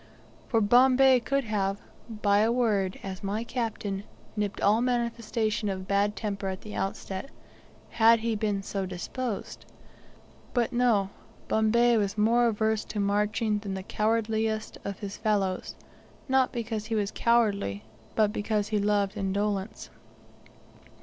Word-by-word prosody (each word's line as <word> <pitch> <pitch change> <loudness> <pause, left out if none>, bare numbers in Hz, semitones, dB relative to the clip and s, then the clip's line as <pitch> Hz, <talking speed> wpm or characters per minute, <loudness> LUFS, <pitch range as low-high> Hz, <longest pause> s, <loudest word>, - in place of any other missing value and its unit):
For 225 -2 +2
Bombay 255 +4 +6
could 275 +3 0
have 200 -3 -1 0.3
by 205 -2 +2
a 220 +2 +3
word, 210 -6 +1
as 190 0 -6
my 205 +3 -2
captain, 220 -5 -3 0.3
nipped 210 -1 -2
all 210 +3 +3
manifestation 230 -3 -1
of 190 -1 -4
bad 200 +1 +1
temper 200 -2 -3
at 190 0 -4
the 210 - -9
outset, 195 +4 -4 0.6
had 230 0 +5
he 230 -1 0
been 205 -2 -1
so 195 -1 -3
disposed. 205 +5 -5 0.9
But 240 +1 +1
no, 225 -6 +2 0.4
Bombay 235 +2 +3
was 205 -1 -1
more 235 +3 +4
averse 220 -1 0
to 210 - -5
marching 210 +1 +1
than 200 -2 -5
the 190 - -5
cowardliest 220 +1 -1
of 200 -1 -4
his 200 -2 -6
fellows, 200 -4 -1 0.5
not 265 -1 +3
because 225 -2 -3
he 225 - -1
was 205 -1 0
cowardly, 205 - +1 0.3
but 210 -1 +3
because 210 0 -1
he 215 -1 +1
loved 205 -1 +1
indolence. 200 +1 -2
210 Hz, 135 wpm, -28 LUFS, 200-230 Hz, 0.9 s, Bombay